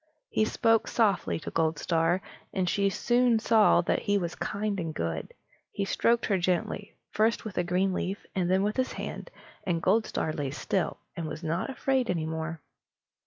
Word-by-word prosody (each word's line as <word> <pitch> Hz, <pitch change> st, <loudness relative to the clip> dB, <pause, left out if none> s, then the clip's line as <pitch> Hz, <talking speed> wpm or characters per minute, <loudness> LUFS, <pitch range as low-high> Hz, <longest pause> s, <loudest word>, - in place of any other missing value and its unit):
He 215 Hz, -, +2 dB
spoke 225 Hz, 0 st, +2 dB
softly 205 Hz, -8 st, +1 dB
to -, -, -6 dB
Goldstar, 165 Hz, +2 st, +1 dB, 0.3 s
and 185 Hz, -1 st, 0 dB
she 200 Hz, +2 st, +2 dB
soon 240 Hz, +3 st, +3 dB
saw 220 Hz, -4 st, +5 dB
that 170 Hz, -, +1 dB
he 205 Hz, 0 st, +2 dB
was 175 Hz, -3 st, -2 dB
kind 205 Hz, -1 st, -2 dB
and 165 Hz, -2 st, -4 dB
good. 80 Hz, -1 st, -3 dB, 0.4 s
He 200 Hz, -, -2 dB
stroked 230 Hz, +4 st, +2 dB
her 195 Hz, -3 st, +1 dB
gently, 180 Hz, +3 st, -1 dB, 0.2 s
first 220 Hz, +2 st, +1 dB
with 215 Hz, -, -6 dB
a -, -, +2 dB
green 185 Hz, +2 st, +1 dB
leaf, 190 Hz, +2 st, -3 dB
then 185 Hz, +1 st, +2 dB
with 210 Hz, +3 st, -1 dB
his 260 Hz, 0 st, 0 dB
hand, -, -, -6 dB, 0.3 s
and 175 Hz, -3 st, 0 dB
Goldstar 190 Hz, -4 st, +1 dB
lay 145 Hz, -4 st, -2 dB
still, 165 Hz, +6 st, -1 dB, 0.2 s
and 165 Hz, -2 st, -4 dB
was 155 Hz, +2 st, -6 dB
not 165 Hz, -, -1 dB
afraid 265 Hz, -1 st, 0 dB
any 165 Hz, -3 st, 0 dB
more. 160 Hz, 0 st, -4 dB
190 Hz, 170 wpm, -28 LUFS, 165-215 Hz, 0.4 s, saw